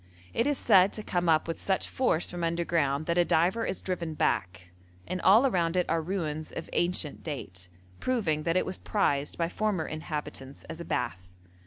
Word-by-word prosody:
It 230 - +1
is 290 -2 +2
said 195 -3 +5
to 215 - -6
come 175 -3 0
up 160 0 +3
with 165 - -4
such 190 -1 0
force 245 -10 0
from 175 -1 -4
underground 165 -4 0
that 170 +1 +1
a - - +6
diver 180 +8 +2
is - - -4
driven 170 -4 -3
back, 90 -8 -1 0.4
and 185 - -3
all 215 +8 +6
around 175 -8 +1
it 180 - +3
are 165 0 +2
ruins 155 -3 -3
of 165 - -7
ancient 175 -4 -1
date, 95 - -6 0.3
proving 205 -12 0
that 165 +3 +1
it - - +2
was 185 - -4
prized 145 -9 0
by 170 - +1
former 195 -3 -1
inhabitants 150 -3 -6
as 160 - -8
a 170 - -6
bath. 90 +1 -3
170 Hz, 190 wpm, -29 LUFS, 155-185 Hz, 0.4 s, a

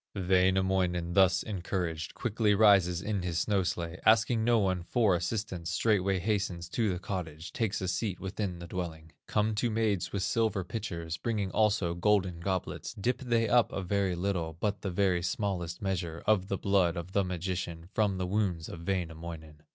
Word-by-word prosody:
Wainamoinen, 95 -2 +2
thus 95 -2 +4
encouraged, 90 -5 -3
Quickly 110 -2 +1
rises 95 -5 +5
in 105 -2 -1
his 90 -2 -2
snow 100 +3 +2
sledge, 85 -1 -3
Asking 115 +1 +4
no 120 +1 +4
one 95 -4 +1
for 105 +2 +2
assistance, 90 -1 -3
Straightway 95 0 +2
hastens 95 -3 -1
to 110 +1 0
the 90 - -2
cottage, 85 -4 -5
Takes 110 -5 -1
a 95 - -2
seat 95 +1 -2
within 95 -1 -3
the 85 - -8
dwelling. 80 -3 -5 0.2
Come 105 +1 +1
two 115 +3 0
maids 110 -4 0
with 100 -2 -2
silver 110 -4 +1
pitchers, 85 -5 -4
Bringing 105 -2 -2
also 105 -4 +2
golden 95 -1 +1
goblets; 95 +1 -3
Dip 120 +5 -1
they 120 -4 +1
up 120 +1 +4
a 95 - -3
very 95 0 0
little, 85 -3 -2
But 105 +1 -1
the 100 - -2
very 90 -1 +1
smallest 90 -2 -2
measure 85 -4 -2
Of 100 -3 +3
the 100 - -1
blood 95 -4 +2
of 85 +2 -5
the 100 +1 +2
magician, 90 -2 -4
From 105 -3 +1
the 95 - -1
wounds 90 -4 -1
of 85 0 -9
Wainamoinen. 80 -4 -4
95 Hz, 175 wpm, -30 LUFS, 85-105 Hz, 0.2 s, rises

